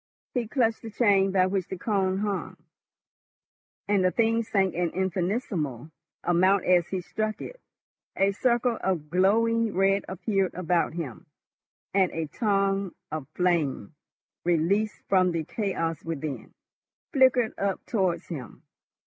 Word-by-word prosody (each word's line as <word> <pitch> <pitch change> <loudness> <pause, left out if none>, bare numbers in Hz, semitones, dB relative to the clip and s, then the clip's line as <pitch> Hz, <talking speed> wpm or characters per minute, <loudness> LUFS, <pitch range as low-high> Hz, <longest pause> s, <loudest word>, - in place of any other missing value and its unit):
He 245 -3 -1
clutched 230 -2 +1
the 225 - -7
chain 200 -3 +3
by 185 -1 +4
which 185 -1 -1
the 190 - -5
cone 190 -1 0
hung, 205 -2 -3 1.3
and 200 -2 +2
the 185 - +4
thing 230 +3 +2
sank 195 -4 +1
an 175 0 0
infinitesimal 180 - -2 0.3
amount 185 +3 +3
as 180 -2 +4
he 190 -1 -3
struck 215 +4 -3
it. - - -9 0.5
A 195 +1 +3
circle 240 +2 +1
of 165 -6 -2
glowing 225 +5 +2
red 195 +1 +3
appeared 195 0 -1
about 175 -2 0
him, 150 -9 -6 0.7
and 190 -2 +3
a 165 -1 -2
tongue 195 0 0 0.2
of 155 -4 -4
flame, 165 - 0 0.5
released 175 +6 +1
from 185 -2 +3
the 165 -1 -1
chaos 165 -4 -2
within, 155 -3 -5 0.6
flickered 260 -4 +4
up 195 -1 -1
towards 190 -7 0
him. 140 -8 -8
190 Hz, 130 wpm, -27 LUFS, 175-215 Hz, 1.3 s, by